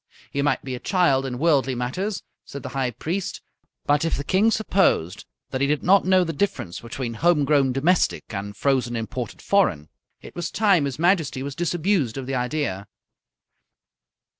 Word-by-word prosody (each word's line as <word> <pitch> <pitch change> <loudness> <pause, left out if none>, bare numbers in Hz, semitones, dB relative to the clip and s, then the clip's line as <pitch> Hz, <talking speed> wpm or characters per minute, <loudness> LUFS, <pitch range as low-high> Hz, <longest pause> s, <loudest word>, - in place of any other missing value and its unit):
He 140 - -1
might 140 -2 0
be 130 - -5
a 125 - -5
child 140 -8 +2
in 125 -1 -4
worldly 135 -3 +2
matters, 180 - -3 0.2
said 140 -2 -9
the - - -5
High 135 -2 0
Priest, 165 - -4 0.5
but 145 +1 +2
if 165 - 0
the 140 - -3
King 195 +8 +3
supposed 190 - +1 0.3
that 130 - -2
he 140 - +3
did 150 0 0
not 195 +1 +4
know 185 -1 +5
the 165 -1 -3
difference 150 - -2
between 115 +1 -5
home 150 +4 +2
grown 140 -2 +3
domestic 155 +8 +1
and 100 0 -5
frozen 130 -3 +1
imported 115 +1 -5
foreign, 95 - +1 0.3
it - - -13
was 175 - -3
time 195 -8 +3
his 135 -2 -4
Majesty 160 -6 +1
was 140 0 -5
disabused 175 - 0
of 135 - -4
the 135 - -4
idea. 125 -6 -2
140 Hz, 175 wpm, -23 LUFS, 125-175 Hz, 0.5 s, know